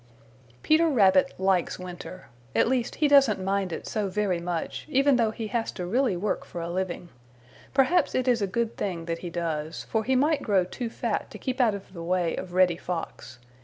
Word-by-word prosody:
Peter 320 +2 +4
Rabbit 190 -8 +4
likes 190 -2 +1
winter. 185 0 -9 0.3
At - - +4
least 250 -1 0
he 305 - +2
doesn't 275 -8 +5
mind 195 -1 -1
it - - -5
so 210 -3 -2
very 190 -3 0
much, 170 -1 -4
even 275 -1 +4
though 230 -2 +2
he 220 +1 -5
has 235 -1 -1
to 180 - -5
really 235 0 +1
work 205 +4 -2
for 175 - -8
a 170 0 -4
living. 180 -1 -3 0.7
Perhaps 290 +5 +3
it 255 0 0
is 240 -3 +3
a 200 - +1
good 230 +4 -2
thing 175 -5 -3
that 165 0 -3
he 175 - -6
does, 165 -2 -3
for 220 -1 -1
he 260 +4 +1
might 295 +4 +2
grow 195 -4 +2
too 230 +6 -5
fat - - -3
to - - -9
keep 260 0 -2
out 225 -4 +3
of 195 -1 -10
the 170 - -7
way 175 0 0
of 180 -1 -6
Reddy 180 -2 +4
Fox. 170 -7 -6
195 Hz, 205 wpm, -26 LUFS, 180-245 Hz, 0.7 s, doesn't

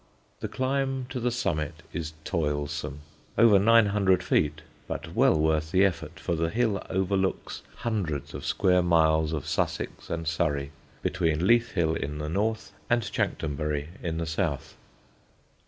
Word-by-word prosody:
The - - -3
climb 135 0 -1
to 130 - -3
the 125 +1 +1
summit 75 - -2
is 80 -2 -4
toilsome, 75 -3 -2 0.4
over 110 -3 +7
nine 115 +2 +6
hundred 100 -2 +2
feet, 75 +1 +1 0.2
but - - -5
well 80 - +4
worth 80 0 +1
the 95 +4 +4
effort, 85 -2 -3
for 85 - -2
the 80 0 0
hill 110 -1 +1
overlooks 95 0 -1
hundreds 95 - -3
of - - -6
square 90 -2 +3
miles 80 -2 +3
of 75 -3 -3
Sussex 75 - -2
and 85 -1 -3
Surrey, 75 -4 0 0.3
between 80 -1 +1
Leith 120 +2 +4
Hill 80 -4 +2
in 75 -1 -3
the 75 0 -4
north 110 +6 -1 0.2
and 120 -1 +3
Chanctonbury 75 -4 -2
in 80 -2 -2
the 85 - -1
south. 80 -3 -2
85 Hz, 150 wpm, -27 LUFS, 75-100 Hz, 0.4 s, over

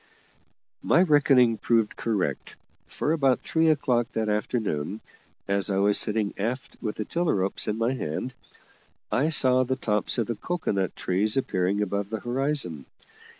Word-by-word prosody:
My 170 - +4
reckoning 135 -8 +4
proved 115 -3 +1
correct, 110 -5 -2 0.3
for 150 - -2
about 135 -6 +2
three 160 0 +2
o'clock 125 -6 +1
that 110 -1 -1
afternoon, 105 -4 -2 0.5
as 100 +1 0
I 95 - 0
was 100 +1 +3
sitting 105 -1 -1
aft 120 +6 -3
with 110 -3 -3
the 105 - -4
tiller 170 -5 0
ropes 95 0 -1
in 105 - -1
my 115 +3 +1
hand, 125 +2 -4 0.8
I 145 +5 +2
saw 130 -4 +3
the 130 +1 -1
tops 105 -4 0
of 115 - +1
the 115 - -2
cocoa 175 +6 -3
nut 95 -2 -1
trees 105 +6 0
appearing 100 -4 0
above 100 0 -2
the 110 0 -3
horizon. 120 - -2
115 Hz, 155 wpm, -26 LUFS, 100-130 Hz, 0.8 s, My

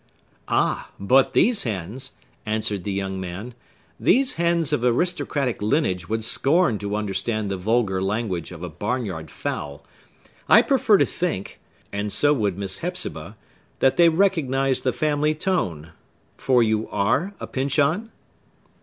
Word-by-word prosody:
"Ah, - - 0
but 130 +7 +3
these 235 -2 +4
hens," 110 +4 -4 0.3
answered 105 -3 -2
the 100 - -2
young 95 -1 -3
man,—"these 120 - -2
hens 170 -2 +1
of 120 - 0
aristocratic 135 - 0
lineage 105 - 0
would 110 +2 -2
scorn 135 - +2
to 100 0 -3
understand 105 +1 -2
the - - -1
vulgar 100 -1 0
language 95 -4 -2
of 90 -1 -9
a - - -3
barn 105 +10 -2
yard 80 -6 -6
fowl. 70 0 -5 0.6
I - - +8
prefer 245 -6 +4
to - - +3
think—and 105 - -5
so 145 +6 +3
would 105 -9 -1
Miss 95 -1 -3
Hepzibah—that 130 - -3
they 170 -1 +7
recognize 140 -7 +1
the 130 - +1
family 150 +3 0
tone. 90 - -2 0.4
For 125 -2 +3
you 110 -1 0
are 130 - 0
a - - -5
Pyncheon?" 145 +10 0
115 Hz, 135 wpm, -23 LUFS, 100-150 Hz, 0.6 s, I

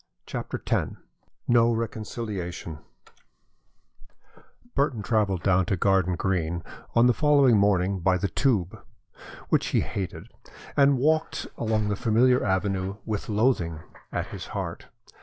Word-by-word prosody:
CHAPTER - - -5
X - - 0 0.5
NO 120 -1 +4
RECONCILIATION 105 -7 -5 1.9
Burton 135 -6 0
travelled 100 -5 0
down 95 -1 +3
to 95 - 0
Garden 95 -1 +2
Green 85 -2 -1 0.3
on 115 +1 +6
the 125 - +5
following 140 -5 +4
morning 100 -2 +2
by 90 +1 +2
the 100 - -1
Tube, 95 - 0 0.7
which - - +2
he - - +2
hated, 95 -3 -5 0.5
and 140 -1 +5
walked 155 +4 +1
along 110 -2 0
the 105 - 0
familiar 120 +5 +3
avenue 95 0 -1
with 110 -1 -3
loathing 105 -8 +1 0.3
at - - -2
his - - -7
heart. - - -5
105 Hz, 120 wpm, -26 LUFS, 95-120 Hz, 1.9 s, on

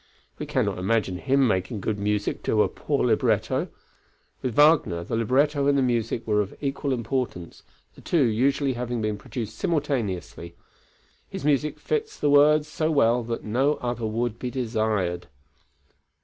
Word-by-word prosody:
We - - -5
cannot - - -1
imagine 95 -2 0
him 135 +2 +2
making 95 +1 -1
good 105 +1 -2
music 105 0 -1
to - - +3
a - - +1
poor - - -2
libretto, - - +1 0.7
with 125 -4 -3
Wagner 145 - +4
the 85 - -3
libretto 140 +5 +2
and 140 0 +3
the 135 - +3
music 120 -2 -1
were 105 -1 +2
of 100 - -5
equal 140 0 -2
importance, 120 -7 -3 0.3
the - - -16
two 165 -5 +2
usually 130 +4 +1
having 120 -1 -3
been 105 -1 -2
produced 110 -1 -6
simultaneously; 105 - -2 0.7
his - - -6
music 150 0 +1
fits 440 -1 -2
the 145 - +2
words 150 +1 +5
so 155 +1 -1
well 125 -6 +3
that 115 0 -4
no 130 +7 +1
other 120 -2 -3
would 115 +1 -2
be 125 - -3
desired. 110 - -1
120 Hz, 155 wpm, -25 LUFS, 105-140 Hz, 0.7 s, words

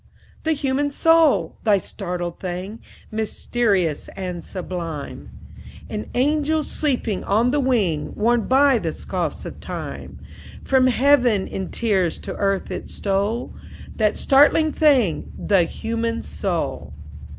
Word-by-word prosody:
"The 320 - +3
human 285 0 0
soul! 325 +1 +3
That 205 -4 +3
startling 175 -3 -4
thing, 185 +4 -5 0.3
Mysterious 210 -6 0
and 180 -3 -5
sublime; 170 -5 -6 0.6
An 105 - -4
angel 300 +4 +2
sleeping 250 -10 -1
on 225 +5 +2
the 295 - +1
wing, 215 - 0
Worn 230 +1 +1
by 270 -1 +4
the - - -3
scoffs - - -4
of - - -8
time. - - -7 0.5
From 260 -1 +3
heaven 250 -5 +3
in 190 -1 -5
tears 195 -7 0
to - - -7
earth 195 -1 0
it - - -5
stole 200 +4 -1 0.4
That 215 -2 +1
startling 295 +3 +4
thing, 265 - +2
the 190 -4 +3
human 230 +4 -3
soul." - - -3
225 Hz, 120 wpm, -22 LUFS, 190-270 Hz, 0.6 s, by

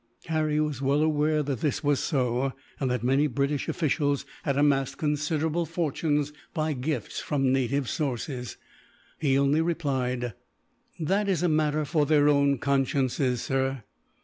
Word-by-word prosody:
Harry 155 -1 +1
was 150 -3 -1
well 140 +2 +2
aware 155 0 +2
that 135 -4 -2
this 150 0 -1
was 145 -1 +2
so, 130 -2 0 0.3
and 135 - 0
that 125 -2 -1
many 135 +4 +3
British 140 +1 -1
officials 145 -3 0 0.2
had 140 -3 -1
amassed 140 -2 +2
considerable 155 +2 0
fortunes, 150 -3 -1 0.2
by 155 -1 0
gifts 130 -3 -3
from 135 -3 0
native 135 +1 0
sources. 125 -3 -3 0.6
He 135 -3 +2
only 140 +3 +3
replied: 130 -8 -1 0.7
"That 195 +6 +1
is 180 -3 +1
a - - +4
matter 155 -1 +1
for 150 -1 +1
their 150 -2 +4
own 140 -1 +3
consciences, 135 -2 0
sir. 135 -2 -1
145 Hz, 145 wpm, -27 LUFS, 135-155 Hz, 0.7 s, a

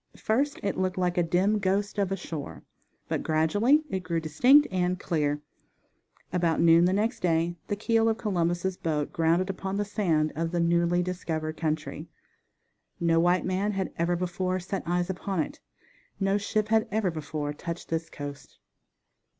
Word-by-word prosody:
First 275 +6 0
it 200 -2 -1
looked 185 -1 -1
like 180 -1 +1
a - - +5
dim 185 +5 +2
ghost 200 +2 0
of 195 -2 0
a 195 - 0
shore, 160 -5 -7 0.4
but - - -1
gradually 205 - +3
it 190 - 0
grew 170 -2 -2
distinct 245 - +5
and 180 0 0
clear. 150 -5 -1 0.9
About 170 -2 +1
noon 170 +1 +6
the 180 - +3
next 215 +5 0
day 170 0 +1
the 205 - -1
keel 225 +2 +2
of 225 - 0
Columbus' 180 -3 -1
boat 150 -3 -2
grounded 165 +3 +2
upon 195 +1 -4
the 205 - 0
sand 170 -7 0
of 165 +2 -1
the 175 +1 -1
newly 170 +1 +2
discovered 160 -3 -3
country. 155 -2 -3 0.9
No 165 -1 +3
white 175 +2 +3
man 195 +3 0
had 195 -1 -3
ever 170 +1 +1
before 185 +1 -1
set 190 +2 -4
eyes 175 +1 0
upon 190 0 -3
it. 155 - -3 0.6
No 195 0 +2
ship 210 +1 -1
had 220 0 +3
ever 205 -3 0
before 150 -2 -4
touched 170 +3 -6
this 165 0 -2
coast. 145 -1 -8
180 Hz, 165 wpm, -27 LUFS, 165-195 Hz, 0.9 s, noon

